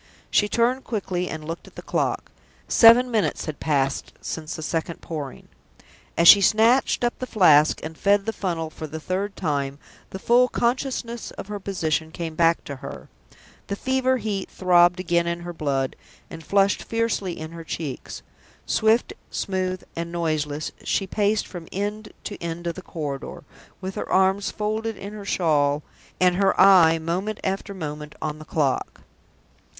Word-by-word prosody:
She 210 - +3
turned 245 +4 +1
quickly, 185 -5 -2
and 155 -1 -6
looked 165 +2 -6
at - - -16
the - - -9
clock; - - -1 0.4
seven 245 +2 +7
minutes 220 -3 0
had 155 -2 -5
passed 140 -3 0
since 160 0 -5
the 160 - -6
second 165 +1 -3
Pouring. 150 -5 -7 0.7
As 170 +1 +5
she 200 - +10
snatched 225 +6 +3
up 240 - 0
the 255 - -4
Flask, 155 -9 +5
and 160 +1 -6
fed 200 +3 +2
the 225 - -2
funnel 165 -6 -3
for 155 - -7
the 160 +2 -6
third 195 +5 -3
time, 140 -5 -2 0.3
the - - -6
full 240 +5 +4
consciousness 240 -1 -2
of 195 - -9
her 205 -1 -4
position 160 -5 -1
came 165 0 -5
back 165 +1 +3
to 140 - -7
her. - - -9 0.6
The 200 - -2
fever 260 +3 +1
heat 205 -4 -3
throbbed 175 -1 +4
again 170 -1 +1
in 170 0 -2
her 175 0 -6
blood, 135 -4 -1 0.4
and 160 - -8
flushed 195 +4 +2
fiercely 225 -6 -1
in 160 0 -6
her 165 0 -8
cheeks. 155 -4 -6 0.4
Swift, 225 - +2 0.2
smooth, 185 -1 -2
and 170 0 -4
noiseless, 155 -3 -2
she 195 - 0
paced 205 +2 +1
from 175 -3 -9
end 210 +2 -4
to 205 - -7
end 170 0 -5
of 170 - -1
the 185 - -9
corridor, 150 -7 -6 0.4
with 190 0 -4
her - - -5
arms 190 +1 +3
folded 215 +1 -2
in 200 +1 -8
her 210 -1 -8
shawl 150 -6 +1 0.4
and 180 -1 +4
her 195 0 +2
eye 180 -4 +7
moment 180 +6 -3
after 195 +1 -3
moment 150 -3 -6
on 155 0 -4
the 155 - -10
clock. 145 -4 -1
180 Hz, 165 wpm, -24 LUFS, 160-205 Hz, 0.7 s, she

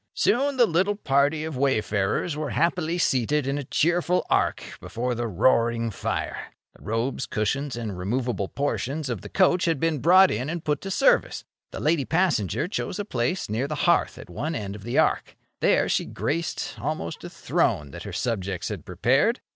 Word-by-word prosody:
Soon 275 +2 +2
the 245 - +6
little 190 +3 +1
party 145 -3 +1
of 160 -2 -4
wayfarers 120 - 0
were 150 -1 -3
happily 170 0 0
seated 140 -2 +1
in 140 +1 -1
a - - -4
cheerful 175 +6 +1
arc - - +1 0.2
before 125 +2 -3
the 120 0 -2
roaring 115 +3 +2
fire. 95 - -4 0.2
The - - -20
robes, 115 +4 -2
cushions, 135 +7 -1
and 110 -5 -4
removable 110 +3 -2
portions 140 +2 -2
of 110 -7 -4
the - - -9
coach 185 -1 +3
had 165 -5 +1
been 165 -1 0
brought 185 +6 +6
in 125 +7 -2
and 165 0 -4
put 150 -2 0
to 195 - -5
service. - - +2 0.3
The - - -7
lady 155 -1 +2
passenger 155 - +1
chose 190 -2 -3
a 205 - -3
place 130 - -1
near 115 +6 -1
the 150 - -3
hearth 175 - +2
at - - -10
one 155 +3 -4
end 100 -5 -4
of 105 - -10
the 120 +4 -3
arc. - - +1 0.2
There - - +3
she - - +1
graced 150 - -3
almost - - -4
a - - -6
throne 75 -2 0
that - - -8
her - - -7
subjects 100 -6 -2
had 100 -7 -5
prepared. 130 - +2
140 Hz, 185 wpm, -25 LUFS, 115-170 Hz, 0.3 s, the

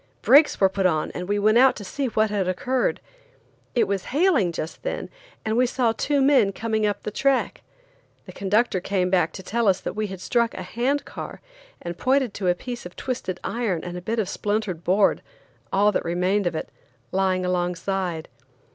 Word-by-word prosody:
Brakes 290 +3 +6
were 195 - +6
put 190 0 +1
on, 155 -3 -1
and 180 +1 -6
we 205 - +1
went 215 +3 +4
out 260 0 +6
to 205 - -8
see 270 +7 -3
what 215 -2 +1
had 200 -3 0
occurred. 250 +8 0 0.8
It 230 -4 +3
was 195 -2 -2
hailing 290 - +2
just 160 -1 -6
then, - - -4 0.3
and 220 0 0
we 250 +1 +3
saw 245 -2 +1
two 280 +4 +1
men 265 -8 +4
coming 220 0 0
up 205 -1 -3
the 210 - -4
track. 270 +4 0 0.6
The - - -10
conductor 200 +1 +1
came 180 -1 0
back 175 -4 +3
to 190 - -8
tell 230 +3 0
us 190 -1 +3
that - - -4
we 215 0 -1
had 190 -2 -7
struck 235 +4 0
a 185 - -5
hand 250 +9 -1
car, - - -8 0.4
and 175 0 -6
pointed 260 -3 +2
to 190 - -3
a 175 - +3
piece 240 +5 -7
of 175 - -17
twisted 215 -8 -4
iron 215 -9 -2
and 175 0 -6
a 180 - -5
bit 225 +6 -2
of 215 -4 0
splintered 205 -4 -2
board–all 200 +1 0
that - - -1
remained 180 +3 +1
of 170 - -2
it–laying 185 +9 -3
alongside. 180 -1 -2
200 Hz, 190 wpm, -24 LUFS, 180-235 Hz, 0.8 s, Brakes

